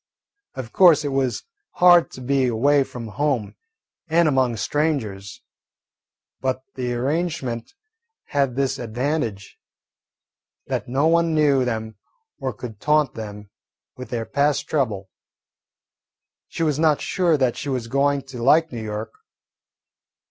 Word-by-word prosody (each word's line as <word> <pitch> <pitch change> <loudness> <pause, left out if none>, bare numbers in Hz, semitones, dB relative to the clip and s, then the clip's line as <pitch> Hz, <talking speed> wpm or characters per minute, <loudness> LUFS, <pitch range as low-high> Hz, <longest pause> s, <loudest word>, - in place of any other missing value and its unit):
Of 120 -3 -7
course, 170 -5 +6
it - - 0
was 135 -2 -1 0.3
hard 175 -1 +6
to 130 - -9
be 135 0 +1
away 140 +5 +3
from 120 -3 -8
home 135 -3 -1 0.5
and 165 +1 +3
among 130 -5 +1
strangers, 105 -7 -2 1.0
but 130 0 -2
the 125 -2 -3
arrangement 140 - -2 0.5
had 140 -5 0
this 135 -1 -1
advantage, 120 -3 -3 1.1
that - - -3
no 135 +5 +1
one 165 0 +3
knew 140 -4 +3
them 110 -2 -4 0.4
or 130 - -2
could 110 -1 -9
taunt 150 -1 +2
them 105 -2 -8 0.4
with 125 -3 -9
their 115 -2 -3
past 145 +3 0
trouble. 105 -10 -1 1.4
She 165 - -3
was 150 -2 0
not 155 -2 +3
sure 175 -4 +1
that 130 -3 +1
she 145 - -5
was 130 -3 -2
going 140 +2 +1
to 135 -3 -9
like 155 +6 +4
New 120 -2 -5
York. 110 0 -5
135 Hz, 130 wpm, -22 LUFS, 115-150 Hz, 1.4 s, course